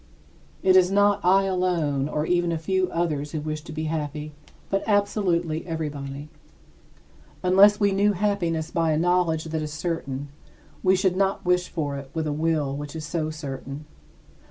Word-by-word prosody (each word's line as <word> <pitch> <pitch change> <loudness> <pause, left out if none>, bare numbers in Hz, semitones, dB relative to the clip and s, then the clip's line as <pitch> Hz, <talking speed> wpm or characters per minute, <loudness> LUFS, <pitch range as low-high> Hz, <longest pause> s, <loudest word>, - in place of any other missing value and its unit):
It 185 -1 +5
is 185 -1 +6
not 205 0 +3
I 190 +2 +5
alone 170 -7 0
or 150 0 -1
even 175 0 +1
a 165 - 0
few 185 +3 0
others 150 -3 -2
who 155 - -1
wish 155 0 -4
to 160 - -10
be 155 +1 -4
happy, 155 -1 -3 0.4
but 195 0 0
absolutely 190 -6 +1
everybody. 145 -3 -5 1.2
Unless 195 +3 +6
we 200 -1 +3
knew 200 +2 +3
happiness 175 -5 -1
by 165 -1 +1
a - - +1
knowledge 170 -1 +2
that 160 -1 -3
is 150 -1 -4
certain, 150 -3 -4 0.5
we 185 0 +4
should 190 -1 +1
not 195 0 0
wish 180 0 +2
for 145 -4 -3
it 140 -1 -8
with 160 -1 -1
a 150 - -1
will 155 -3 0
which 145 +1 -6
is 155 -1 -5
so 155 -1 -2
certain. 140 -1 -7
165 Hz, 170 wpm, -25 LUFS, 150-185 Hz, 1.2 s, is